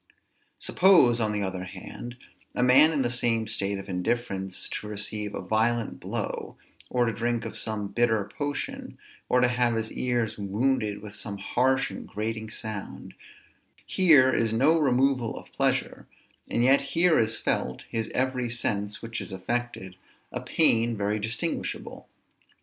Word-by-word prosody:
Suppose, 170 -11 +5
on 110 -2 +1
the 105 -1 -1
other 95 -1 -4
hand, 120 +6 -9 0.4
a 125 - +1
man 135 +5 +7
in 145 -4 +1
the 120 - 0
same 115 -2 +1
state 100 -2 -1
of 95 0 -8
indifference 95 0 -2
to 105 - -5
receive 105 0 -3
a - - -5
violent 110 +3 0
blow, - - -4 0.3
or 125 -1 +2
to 115 - 0
drink 120 +2 -1
of - - -6
some 110 -2 -1
bitter 110 -3 +1
potion, 145 +6 -5 0.3
or 125 - +4
to 125 - +5
have 120 -1 +1
his 110 0 -2
ears 120 -3 -1
wounded 105 +1 0
with 105 -1 -9
some 105 -2 -6
harsh 130 +6 +1
and - - -8
grating 110 +1 -4
sound; 110 -2 -6 0.7
here 150 -8 +5
is 115 -1 +1
no 140 +9 +4
removal 130 -4 +2
of - - -12
pleasure; - - -1 0.4
and 120 - +1
yet 135 +2 +5
here 165 +5 +3
is 110 0 +1
felt, 65 - -2
his 115 -1 -3
every 130 -1 0
sense 105 -3 -2
which 115 -1 -4
is 95 - -7
affected, 95 -1 -4 0.3
a - - -4
pain 115 -7 +2
very 105 +1 0
distinguishable. 110 +2 -3
115 Hz, 155 wpm, -27 LUFS, 105-125 Hz, 0.7 s, man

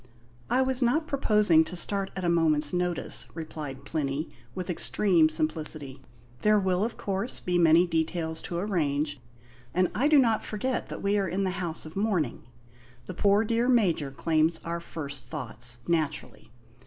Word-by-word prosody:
"I 260 +2 +3
was 260 0 0
not 255 +7 +2
proposing 210 - +3
to 180 - -4
start 195 +2 +1
at 185 -2 -3
a - - +1
moment's 155 -3 +2
notice," 180 -1 -1
replied 150 -4 -7
Plinny, 145 0 -2 0.2
with 185 -1 -4
extreme 180 -2 +2
simplicity. 155 -3 -2 0.4
"There 215 0 +4
will, 190 -1 +1
of 225 +1 -3
course, 200 +4 -3
be 180 -1 0
many 165 +1 +6
details 160 -1 -2
to 170 - -3
arrange; 150 -7 -1 0.6
and 185 0 +2
I 245 +10 +2
do 305 -1 +5
not 230 -5 +3
forget 250 +4 -3
that - - -7
we 200 +1 +2
are 195 - 0
in 185 +3 -1
the 190 - 0
house 175 -3 -3
of 155 - -10
mourning. 190 - -1 0.6
The - - -6
poor 205 +1 +3
dear 230 +2 +1
Major 185 - +2
claims 160 +3 +1
our 170 0 -2
first 145 -5 -6
thoughts, 120 -4 -3
naturally. 160 -8 -2
175 Hz, 165 wpm, -27 LUFS, 155-205 Hz, 0.6 s, many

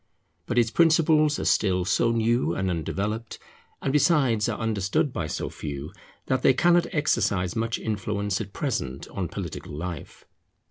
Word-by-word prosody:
But 120 - -2
its 115 -2 +3
principles 155 -2 +4
are - - -3
still 95 -3 +2
so 115 +5 +2
new 115 -5 +1
and 95 -1 -1
undeveloped, 105 +7 -3 0.5
and 135 - 0
besides 140 - +3
are - - -2
understood 110 +4 0
by 85 - -2
so - - -3
few, 70 0 -6 0.3
that 130 0 0
they 130 - +4
cannot 175 +2 +3
exercise 100 - 0
much 115 0 -1
influence 105 -1 -2
at 100 -2 -7
present 70 - -3
on 95 -3 -3
political 85 -5 -6
life. 85 +1 -7
110 Hz, 150 wpm, -25 LUFS, 90-130 Hz, 0.5 s, principles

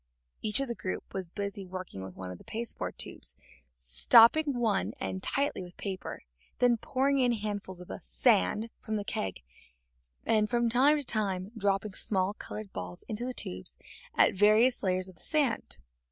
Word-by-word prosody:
Each 215 +2 +4
of 275 - -1
the 235 - -2
group 185 -5 -5
was 190 -3 -4
busy 200 +1 -4
working 185 - -7
with 95 -1 -9
one 90 -1 -6
of 90 - -9
the - - -15
pasteboard 230 +1 -5
tubes, - - -7 0.4
stopping 225 - +5
one 205 - +1
end 95 -1 -3
tightly 280 -6 0
with 180 -1 -10
paper, 190 -2 -5 0.4
and 245 -1 +5
then 235 - +2
pouring 270 +4 +1
in 245 -2 +3
handfuls 205 -4 -4
of 180 - -10
the - - -6
"sand" 90 - +2
from 215 - -2
the 205 - -1
keg, 95 - -3 0.8
and 215 -1 +2
from 240 -1 +2
time 275 +5 +5
to 290 - -3
time 200 -5 -1
dropping 200 -1 0
small 190 0 0
colored 210 -1 -8
balls 90 -1 -6
into 225 +3 -3
the 255 - -3
tubes 90 +1 -4 0.4
at - - +5
various 215 +6 +4
layers 185 -1 0
of 185 -3 -14
the - - -18
sand. 285 -8 0
205 Hz, 180 wpm, -30 LUFS, 180-235 Hz, 0.8 s, stopping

